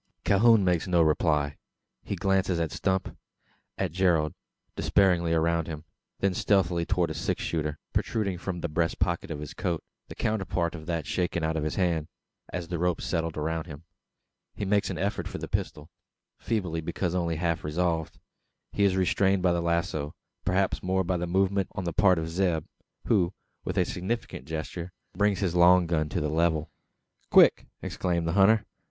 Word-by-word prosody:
Calhoun 110 0 +5
makes 90 0 +1
no 85 -2 +4
reply. 75 -2 +1 0.4
He - - -4
glances 95 -1 +1
at 80 -2 -1
Stump 95 -1 -1 0.6
at - - -1
Gerald 85 -4 +2 0.4
despairingly 90 -4 +2
around 85 0 +1
him; 80 -2 -6 0.4
then 100 -1 +2
stealthily 90 -3 +1
towards 90 -4 +1
a - - -2
six 75 - -2
shooter, 75 -2 -2 0.2
protruding 100 -6 -1
from 90 -1 -4
the 85 - -1
breast 85 +1 0
pocket 85 -1 -1
of 80 - -4
his 75 -1 -7
coat 90 -4 -2 0.2
the - - -9
counterpart 95 -5 -1
of 80 -3 -9
that 85 -4 -2
shaken 85 +1 -1
out 80 0 0
of 80 - -1
his 75 - -2
hand, 85 -5 0 0.4
as 90 -1 -4
the 85 -1 -3
rope 90 -1 +1
settled 80 -2 -2
around 80 +2 -2
him. 75 -1 -9 0.7
He 105 - -3
makes 100 +1 +2
an 95 - -3
effort 100 +4 -2
to - - -8
reach - - -5
the - - -4
pistol 75 +1 -3 0.5
feeble, 90 -8 -2
because 85 +2 -2
only 85 -2 0
half 85 0 -1
resolved. 80 +1 -1 0.6
He 100 - +1
is 95 -1 +3
restrained 95 0 +2
by 90 - +4
the 85 - 0
lazo; 85 -3 -1 0.3
perhaps 95 +1 +1
more 95 +1 +1
by 90 +1 -1
a 90 0 -1
movement 95 +2 +1
on 100 -2 -4
the 85 -1 -2
part 95 -2 +4
of 80 0 -2
Zeb; 85 -2 0 0.4
who, 95 -5 +2 0.3
with 90 - -4
a 90 - +4
significant 95 - -4
gesture, 85 +3 -5 0.2
brings 100 0 +2
his 95 -4 0
long 90 +1 +6
gun 80 -2 0
to - - -1
the 75 - 0
level. 80 -1 +1 0.6
"Quick!" - - +6 0.2
exclaims 85 -2 -1
the 85 - -1
hunter. 100 +3 +5
85 Hz, 180 wpm, -27 LUFS, 80-95 Hz, 0.7 s, long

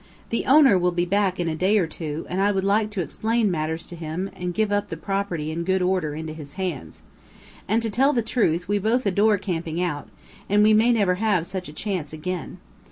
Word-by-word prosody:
The 230 - -1
owner 270 -8 +6
will 180 0 +2
be 175 0 0
back 190 0 +1
in 175 - -1
a 165 - 0
day 190 +6 +2
or 190 - +3
two, 160 -1 -5
and 185 +2 -2
I 205 +1 +3
would 190 -1 -1
like 210 +2 +2
to 205 -3 -3
explain 220 +4 0
matters 160 0 -2
to 175 - -9
him 165 +4 -4
and 180 0 -3
give 210 +3 0
up 205 0 0
the 165 - -5
property 180 -4 -2
in 170 +2 -3
good 190 +1 +1
order 180 -5 0
into 160 0 -5
his 150 -3 -10
hands. 175 - -5 0.6
And, 225 +3 +1
to 225 - -1
tell 270 +7 +3
the 235 -5 0
truth, 180 -7 0
we 205 +1 +1
both 225 +5 +1
adore 205 +2 +3
camping 170 -4 -3
out, 165 -5 -2 0.4
and 205 +1 +4
we 215 0 +5
may 225 +3 +5
never 205 -6 +3
have 200 -7 +2
such 185 -3 -5
a - - -10
chance 175 -5 -3
again. 175 +3 -5
185 Hz, 230 wpm, -24 LUFS, 165-210 Hz, 0.6 s, owner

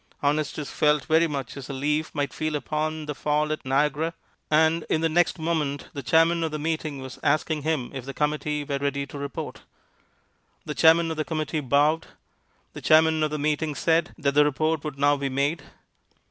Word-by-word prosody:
Honestus 150 0 -1
felt 150 -2 +2
very 165 +1 +3
much 140 -5 -5
as 140 -3 -8
a - - -4
leaf 150 +3 -1
might 145 -2 -1
feel 155 -1 -2
upon 155 +1 -2
the 150 - -3
fall 150 +1 0
at 155 - -3
Niagara, 150 +4 0 0.3
and 160 +2 +3
in 155 - +1
the 165 - +3
next 175 +3 +2
moment 155 -4 -2
the 140 - -5
chairman 165 +4 +3
of 160 - 0
the 155 - -4
meeting 155 -3 -3
was 130 -1 -9
asking 155 +1 +1
him 150 -5 -1
if 135 -2 -5
the 135 - -6
committee 150 0 -1
were 140 -1 -3
ready 140 0 -1
to 140 +1 -9
report. 140 -1 -6 1.0
The 150 - -4
chairman 165 +1 +5
of 160 - -4
the 155 - 0
committee 155 -1 -2
bowed. 145 +4 +2 0.7
The - - -8
chairman 160 0 +4
of 155 - +2
the 150 - -3
meeting 150 +1 -1
said 165 +2 +1
that 140 -4 0
the 150 +1 +6
report 155 +1 0
would 150 -3 -5
now 145 +1 +3
be 140 -1 -2
made. 140 +5 -1
150 Hz, 195 wpm, -25 LUFS, 140-160 Hz, 1.0 s, the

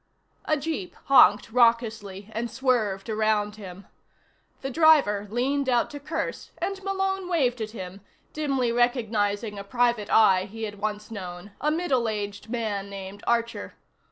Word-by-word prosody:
A 310 - +2
jeep 285 - -4
honked 215 -6 +6
raucously 220 -4 +1
and 235 +2 -2
swerved 230 -5 0
around 215 -1 0
him. 195 -2 -10 0.8
The 270 - -4
driver 275 -10 +4
leaned 260 +4 0
out 240 -2 +2
to 290 - -7
curse 305 +3 -4
and 390 0 -3
Malone 385 -1 -1
waved 255 -9 +1
at 215 - -3
him, 190 -3 -8 0.3
dimly 275 -5 0
recognizing 220 -4 0
a - - -6
private 235 0 +1
eye 190 -4 +5
he 225 +2 -8
had 205 -2 -5
once 210 +1 -3
known, 185 -1 -7
a 300 - +2
middle 285 -8 +1
aged 205 0 -5
man 215 -4 -2
named 195 0 -8
Archer. 235 0 -1
225 Hz, 145 wpm, -26 LUFS, 205-260 Hz, 0.8 s, honked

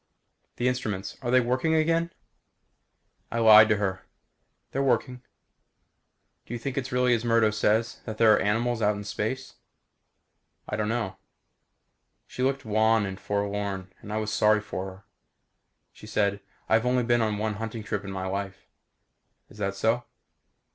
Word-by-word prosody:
"The 120 - 0
instruments 105 -6 -2
are 120 - -3
they 130 +1 +5
working 130 +6 +1
again?" 165 +2 +1 1.2
I 115 - -2
lied 110 -1 +8
to 105 - +4
her. 95 -2 -2 0.7
"They're 135 - -1
working." 125 -1 0 1.3
"Do 120 - -5
you - - -5
think 130 +2 -4
it's 130 -2 -3
really 125 0 +3
as 115 -1 0
Murdo 115 -2 +3
says 110 +2 +1
that 110 -2 -6
there 110 -1 +6
are - - +3
animals 115 +3 0
out 105 0 +2
in 100 - -6
space?" 120 +5 -4 1.1
"I - - -3
don't 105 0 -1
know." 110 -5 -2 1.1
She - - -7
looked 135 0 0
wan 110 0 +3
and 95 0 -6
forlorn 100 -2 -3
and 105 - -9
I 105 - -1
was 110 0 -2
sorry 105 +1 +4
for 100 -3 -5
her. 95 +1 -11 0.9
She 105 - -13
said, 100 -2 0 0.3
"I've 115 +2 +3
only 125 0 +2
been 120 0 +2
on 110 -2 0
one 110 0 -1
hunting 115 -1 -5
trip 105 -1 -3
in 100 - -7
my 95 -1 -4
life." 95 0 -4 0.8
"Is 105 - -15
that 100 -1 -2
so?" 115 +4 +1
110 Hz, 160 wpm, -27 LUFS, 105-120 Hz, 1.3 s, lied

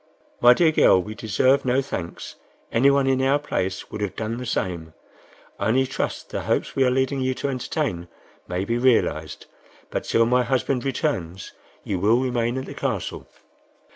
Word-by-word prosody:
"My 120 +1 +7
dear 165 +1 +4
girl, 95 - +5
we 105 +4 -5
deserve 115 +6 +2
no 130 +1 +2
thanks; 95 -10 -5 0.4
anyone 140 +3 +4
in 130 0 +2
our 135 +2 +3
place 95 -9 -3
would 105 - -6
have 100 -2 -3
done 110 +1 -3
the 125 0 -6
same. 85 -7 -3 0.6
I - - 0
only 130 +4 +3
trust 135 - -4
the - - -3
hopes - - -1
we 135 - +3
are 130 - +3
leading 130 +1 0
you 130 0 0
to 140 - -3
entertain 125 - -3 0.4
may 90 +2 -2
be 115 +3 -1
realized, 125 -1 +1 0.5
but - - -2
till 115 - +3
my 125 +2 +3
husband 125 +1 0
returns, 95 - -3 0.3
you 95 -3 -2
will 110 +6 +3
remain 120 -1 -1
at 130 - -4
the - - -8
Castle." - - -4
125 Hz, 175 wpm, -23 LUFS, 105-130 Hz, 0.6 s, My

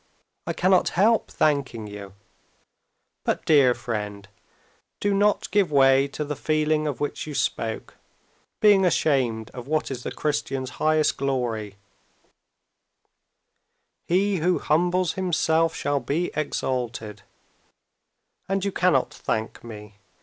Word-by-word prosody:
"I - - -1
cannot 185 0 +3
help 220 +4 +3
thanking 135 -7 0
you." 100 -2 -9 1.1
"But, - - -1
dear 140 -6 +5
friend, 105 -4 -5 0.7
do 205 0 +1
not 205 +1 +1
give 200 -6 +2
way 135 -1 +5
to 150 +2 -5
the 150 0 -4
feeling 155 +1 0
of 145 - -3
which 145 +1 -3
you 150 - -6
spoke—being 145 - -1
ashamed 130 -10 +1
of 125 0 -9
what 155 -1 -1
is 125 -2 -5
the - - -5
Christian's 140 -3 -2
highest 155 0 +2
glory: 120 -7 -2 2.3
he 195 +3 +2
who 175 +2 +1
humbles 175 +3 +1
himself 165 -3 +1
shall 145 -2 0
be 165 +6 -2
exalted. 120 -7 -3 1.3
And 195 0 0
you 200 - 0
cannot 180 -9 +1
thank 110 0 -4
me. 105 -3 -11
145 Hz, 115 wpm, -24 LUFS, 120-175 Hz, 2.3 s, dear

